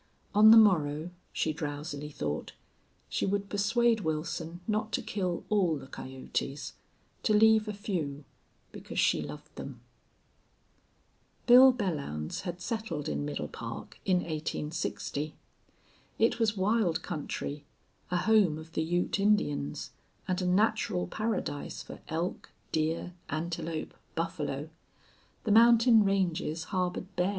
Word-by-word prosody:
On 215 Hz, +1 st, +8 dB
the 225 Hz, -, +10 dB
morrow, 165 Hz, -6 st, +4 dB, 0.2 s
she 155 Hz, -, 0 dB
drowsily 145 Hz, -1 st, -5 dB
thought, 75 Hz, -, -4 dB, 0.5 s
she -, -, -2 dB
would 200 Hz, 0 st, -1 dB
persuade 225 Hz, +3 st, +3 dB
Wilson 165 Hz, 0 st, -3 dB
not 215 Hz, 0 st, -1 dB
to -, -, +1 dB
kill 185 Hz, -4 st, -2 dB
all 185 Hz, -7 st, +2 dB
the 135 Hz, -, -9 dB
coyotes; 135 Hz, +1 st, -5 dB, 0.5 s
to 215 Hz, -, +2 dB
leave 220 Hz, 0 st, +5 dB
a 210 Hz, -, -2 dB
few, 165 Hz, -9 st, -3 dB, 0.5 s
because -, -, -9 dB
she -, -, +3 dB
loved -, -, -9 dB
them. -, -, -7 dB, 1.7 s
Bill 255 Hz, +2 st, +9 dB
Belllounds 150 Hz, -, -3 dB
had 175 Hz, -1 st, -5 dB
settled 180 Hz, -6 st, -3 dB
in 70 Hz, -1 st, -2 dB
Middle 75 Hz, 0 st, -3 dB
Park -, -, -8 dB
in 180 Hz, -2 st, +2 dB
1860. 155 Hz, -1 st, -3 dB, 0.8 s
It 225 Hz, +1 st, +2 dB
was 220 Hz, -2 st, +2 dB
wild 195 Hz, -3 st, +1 dB
country, 145 Hz, -1 st, -4 dB, 0.5 s
a 180 Hz, -, +1 dB
home 195 Hz, -5 st, +4 dB
of 160 Hz, +1 st, -10 dB
the 160 Hz, -, -1 dB
Ute 175 Hz, +4 st, 0 dB
Indians, 195 Hz, -, +1 dB, 0.4 s
and 185 Hz, 0 st, 0 dB
a 180 Hz, -, 0 dB
natural 200 Hz, -, +2 dB
paradise 215 Hz, -, -3 dB
for -, -, -10 dB
elk, 165 Hz, +3 st, -3 dB, 0.2 s
deer, 160 Hz, +3 st, -1 dB, 0.2 s
antelope, 160 Hz, 0 st, -3 dB, 0.2 s
buffalo. 155 Hz, -2 st, -3 dB, 0.7 s
The 215 Hz, -, 0 dB
mountain 230 Hz, 0 st, +7 dB
ranges 175 Hz, -5 st, 0 dB
harbored 185 Hz, 0 st, -2 dB
bear. 180 Hz, +1 st, +2 dB
175 Hz, 125 wpm, -30 LUFS, 150-210 Hz, 1.7 s, the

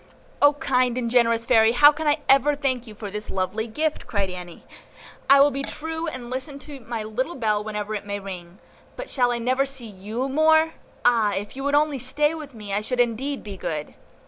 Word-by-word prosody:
"O 290 Hz, 0 st, +7 dB
kind 255 Hz, -5 st, +1 dB
and 235 Hz, -2 st, -2 dB
generous 230 Hz, -2 st, +3 dB
Fairy, 225 Hz, -2 st, +5 dB
how 290 Hz, +4 st, +8 dB
can 305 Hz, +1 st, -4 dB
I 295 Hz, +1 st, +2 dB
ever 275 Hz, +2 st, +5 dB
thank 260 Hz, -4 st, -2 dB
you 215 Hz, -, -10 dB
for 205 Hz, -2 st, -7 dB
this 210 Hz, +1 st, -5 dB
lovely 190 Hz, +4 st, -2 dB
gift!" 305 Hz, +7 st, -2 dB
cried 200 Hz, -6 st, -1 dB
Annie. 180 Hz, -1 st, -9 dB, 0.7 s
"I 275 Hz, 0 st, +8 dB
will 285 Hz, +1 st, +6 dB
be 275 Hz, +1 st, -3 dB
true, 320 Hz, +3 st, -4 dB
and 255 Hz, -5 st, -6 dB
listen 270 Hz, +2 st, -5 dB
to 285 Hz, -1 st, -10 dB
my 230 Hz, -2 st, -5 dB
little 250 Hz, +10 st, -3 dB
bell 215 Hz, -4 st, 0 dB
whenever 210 Hz, 0 st, -4 dB
it 205 Hz, -1 st, -5 dB
may 205 Hz, 0 st, -3 dB
ring. 180 Hz, -2 st, -8 dB, 0.4 s
But -, -, -7 dB
shall 245 Hz, -3 st, +2 dB
I 240 Hz, -, 0 dB
never 255 Hz, +3 st, +1 dB
see 265 Hz, -3 st, -3 dB
YOU 215 Hz, +5 st, -4 dB
more? 315 Hz, +3 st, +4 dB, 0.3 s
Ah! 225 Hz, -4 st, +4 dB
if 205 Hz, +4 st, -5 dB
you 270 Hz, -, -5 dB
would 285 Hz, 0 st, +2 dB
only 295 Hz, -2 st, +2 dB
stay 295 Hz, +5 st, +1 dB
with 300 Hz, -5 st, -8 dB
me, 210 Hz, -2 st, -7 dB
I 205 Hz, -, +1 dB
should 250 Hz, +3 st, -3 dB
indeed 245 Hz, +4 st, 0 dB
be 200 Hz, -2 st, -8 dB
good." 150 Hz, -4 st, -4 dB
245 Hz, 215 wpm, -24 LUFS, 215-285 Hz, 0.7 s, how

